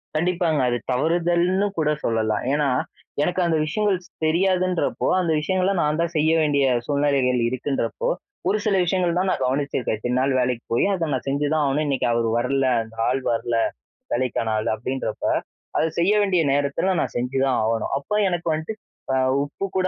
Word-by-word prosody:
கண்டிப்பாங்க. 170 -1 +1
அது 120 - 0
தவறுதல்ன்னு 175 +7 +2
கூட 150 - +2 0.2
சொல்லலாம், 110 -2 0
ஏன்னா 145 -1 +2 0.5
எனக்கு 180 +4 -1
அந்த 165 -2 +2
விஷயங்கள்ஸ் 185 +2 -1 0.2
தெரியாதுன்றப்போ, 185 +2 +1
அந்த 170 -3 0
விஷயங்கள்லாம் 185 +3 +1
நான் 150 +1 0
தான் 170 0 -1
செய்ய 155 +1 +3
வேண்டிய 145 -2 +2 0.2
சூழ்நிலைகள் 140 -3 +1
இருக்குன்றப்போ, 140 - -2 0.4
ஒரு 205 - +2
சில 210 -2 +2
விஷயங்கள் 175 -1 +1
தான் 185 +1 +1
நான் - - -1
கவனிச்சிருக்கேன் 130 -3 -1
இத்தனை 120 +3 -2
நாள் 135 +1 +1
வேலைக்கு 125 -2 -1
போய் 115 - +3
அதை 170 -3 -1
நான் 130 - -2
செஞ்சுதான் 145 +2 +1
ஆவணும். 145 +3 +1
இன்னைக்கு 135 -3 0
அவர் 115 0 +1
வரல 130 +2 +1 0.2
அந்த 110 0 -15
ஆள் 130 +2 0
வரல, 115 0 -1 0.6
வேலைக்கான 120 -3 -1
ஆள் 110 - -1
அப்படின்றப்ப, 130 +4 -4 0.5
அத - - +3 0.2
செய்ய 180 +5 +3
வேண்டிய 190 -4 +2
நேரத்தில 145 +7 +1
நான் - - -3
செஞ்சுதான் 130 +1 0
ஆவணும், 115 +2 -1
அப்போ 145 +9 -3
எனக்கு 175 -1 -2
வன்ட்டு 160 +7 -4 0.4
ஆ - - +2 0.3
உப்பு 145 +7 -5
கூட 185 0 +2
150 Hz, 165 wpm, -23 LUFS, 130-175 Hz, 0.6 s, செய்ய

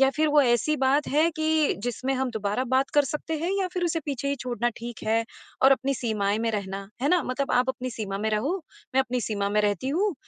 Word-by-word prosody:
या 270 0 +6
फिर 310 +1 +3
वो 295 0 +5
ऐसी 245 +4 +2
बात 270 +2 +2
है 310 +4 +3
कि 315 -1 +2
जिसमें 245 +3 -2
हम 260 -1 -1
दोबारा 215 +2 -1
बात 260 +2 +1
कर 290 -1 +5
सकते 300 +3 -3
हैं 335 +4 -1
या 375 - +1
फिर 360 -1 -1
उसे 330 -1 0
पीछे 280 -1 -3
ही 280 - +1
छोड़ना 240 -2 -1
ठीक 235 -1 -7
है 225 +1 +2 0.4
और 270 +1 +8
अपनी 270 +1 0
सीमाएँ 210 -4 0
में 230 0 0
रहना, 195 -1 -4
है 280 - +2
ना? 355 -2 +3
मतलब 265 +2 -2
आप 250 +1 +3
अपनी 255 -1 -2
सीमा 205 -4 -4
में 215 +2 -1
रहो, 230 - 0 0.4
मैं 265 - +5
अपनी 250 -1 -2
सीमा 200 -2 -1
में 210 +1 +3
रहती 205 +4 0
हूँ 370 +7 +1
260 Hz, 240 wpm, -26 LUFS, 220-290 Hz, 0.4 s, और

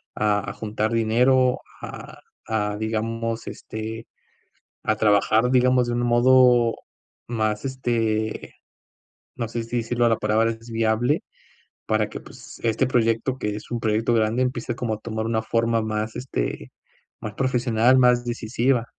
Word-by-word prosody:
a 105 -1 0
a - - -5
juntar 110 0 -2
dinero 125 +3 +3 0.2
a - - -9 0.3
a, 105 -2 -1
digamos, 115 +1 -3
este, 110 +1 -6 0.8
a 110 - +1
trabajar, 110 +3 +3
digamos, 125 -1 +3
de 120 - -1
un 120 - 0
modo 120 -1 +5 0.5
más, 110 -2 -1
este, 115 -4 -2 0.8
no 115 -2 -3
sé 115 +1 -4
si 120 +2 -3
decirlo 120 +1 0
a - - +4
la 115 - +2
palabra 110 +2 +2
es 115 +1 -10
viable 115 +5 +1 0.6
para 110 -1 +1
que, - - -7
pues, - - -13
este 115 +3 +1
proyecto, 115 +1 +1
que 105 -3 -2
es 105 - -10
un 120 -1 -2
proyecto 110 +2 +1
grande, 115 +2 +2
empiece 125 -2 -2
como 120 -3 -2
a 105 - -8
tomar 110 0 -4
una 115 -1 0
forma 115 0 +1
más, 110 0 -3
este, 65 - -4 0.5
más 110 - -5
profesional, 125 -1 +3
más 125 -1 +4
decisiva. 120 +1 0
115 Hz, 150 wpm, -23 LUFS, 110-120 Hz, 0.8 s, modo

